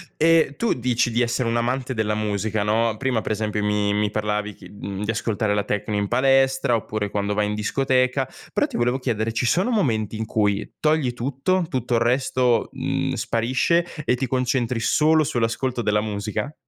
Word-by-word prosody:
E 160 -3 +3
tu 230 - +1
dici 120 -1 0
di 120 - +1
essere 120 0 0
un 115 - 0
amante 130 +2 -1
della 110 -2 0
musica, 105 0 -1
no, 110 +2 +1
prima 125 -3 0
pre 110 - -2
esempio 105 0 -2
mi 105 0 +1
mi 105 0 +1
parlavi 105 0 -2
chi 90 -1 -14
uhm, 100 +1 -5
di 110 - 0
ascoltare 110 -2 -1
la 105 - 0
tecno 105 +1 -2
in 100 0 0
palestra, 135 +1 +3
oppure 110 -2 -3
quando 100 0 -1
vai 105 0 +1
in 105 - -2
discoteca, 130 +3 +1 0.3
però - - +2
ti - - -5
volevo 125 +2 +1
chiedere, 115 -3 -1
ci 115 - 0
sono 185 - +2
momenti 115 - 0
in 110 - -3
cui, 105 -2 -1
togli 155 -5 +1
tutto, 140 +9 -1
tutto 125 -5 -1
il 115 - +2
resto, 125 0 +1
mhmm, - - -2
sparisce 130 +9 +1 0.2
e 125 - +2
ti 130 +1 -2
concentri 125 -2 0
solo 155 +6 +3
sull'ascolto 120 +1 -1
della 105 -1 +1
musica? 105 +7 -3
115 Hz, 185 wpm, -23 LUFS, 105-130 Hz, 0.3 s, E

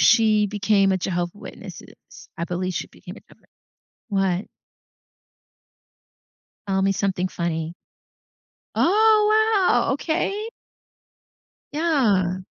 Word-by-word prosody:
she 215 -3 +4
became 200 -1 +2
a 190 - 0
Jehovah 175 -1 -2
Witnesses. - - -12
I 170 - -1
believe 180 +1 -3
she - - -3
became - - -12
a - - -13
Jehovah - - -22 0.6
what? 195 -2 0 2.2
Tell 190 -1 0
me 195 0 +2
something 190 -2 -1
funny. 165 -2 -3 1.0
Oh, 430 0 +4
wow. 245 +2 +2
Okay. 390 +9 -2 1.2
Yeah. 225 - +1
200 Hz, 95 wpm, -23 LUFS, -, 2.2 s, she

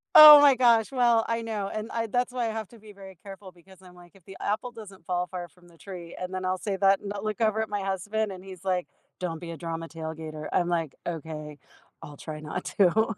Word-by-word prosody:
Oh, 300 -1 +13
my 285 -2 +7
gosh. 235 -1 +4
Well, 240 -3 +3
I 230 0 -1
know. 215 -3 -3
And 215 +1 -4
I 230 0 -1
that's 245 +2 0
why 245 -2 -2
I - - -2
have 220 -2 -5
to 235 - -16
be 210 -1 -14
very 190 -2 -13
careful 195 -1 -10
because 185 +2 -20
I'm, 180 -1 -16
like, 175 -1 -16
"If 190 - -20
the 195 -1 -11
apple 220 +4 -2
doesn't 200 -7 -12
fall 180 0 -1
far 175 -1 -6
from 175 0 -23
the 170 -1 -20
tree." 175 -3 -9
And 185 0 -5
then 185 0 -3
I'll 185 0 0
say 200 -2 -2
that, 195 0 +4
and 200 - -7
I'll 200 0 -6
look 215 +1 -3
over 220 0 +2
at 220 - -3
my 205 -1 -2
husband 200 +2 -2
and 185 0 -9
he's 185 -1 -11
like, 185 -2 -1 0.3
"Don't 170 -3 -4
be 170 0 -8
a 165 - -7
drama 165 -1 -5
tailgater." 160 -1 -7
I'm 175 -1 +1
like, 165 -5 -1
"Okay, 155 -2 -6 0.5
I'll 145 -3 -10
try 155 -1 -7
not 150 - -5
to." 215 +3 +3
190 Hz, 250 wpm, -27 LUFS, 175-220 Hz, 0.5 s, Oh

